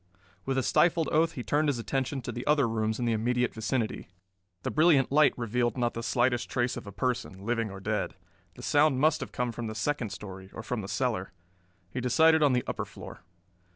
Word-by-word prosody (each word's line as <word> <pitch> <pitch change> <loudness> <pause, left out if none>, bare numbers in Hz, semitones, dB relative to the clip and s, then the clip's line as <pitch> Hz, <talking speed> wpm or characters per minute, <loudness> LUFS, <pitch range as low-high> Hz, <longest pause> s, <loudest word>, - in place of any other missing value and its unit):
With 135 0 -1
a 130 - +2
stifled 165 +2 +3
oath 160 +2 +3
he 125 - -5
turned 150 +3 +1
his 140 - 0
attention 135 +2 -2
to 120 - -4
the 120 +1 -5
other 145 -4 +4
rooms 110 -1 -1
in 120 - -2
the 115 - +2
immediate 125 +2 0
vicinity. 110 +1 -2 0.6
The - - -2
brilliant 150 -5 +4
light 150 0 +5
revealed 120 +1 0
not 120 -1 0
the 115 - -4
slightest 120 0 +1
trace 120 0 0
of - - -8
a - - -6
person, 100 -6 -3
living 115 -1 0
or 95 0 -8
dead. 95 - -2 0.4
The - - -11
sound 150 -4 +3
must 155 +3 +3
have - - -6
come 125 -1 -2
from 115 0 -5
the 110 - -5
second 120 +1 -1
story 95 -1 -9
or 110 - -6
from 120 -1 -3
the 95 - -7
cellar. 110 -6 -2 0.6
He 125 - -3
decided 160 +6 +4
on 145 -3 +4
the 125 - +1
upper - - -3
floor. - - -10
125 Hz, 215 wpm, -29 LUFS, 110-135 Hz, 0.6 s, light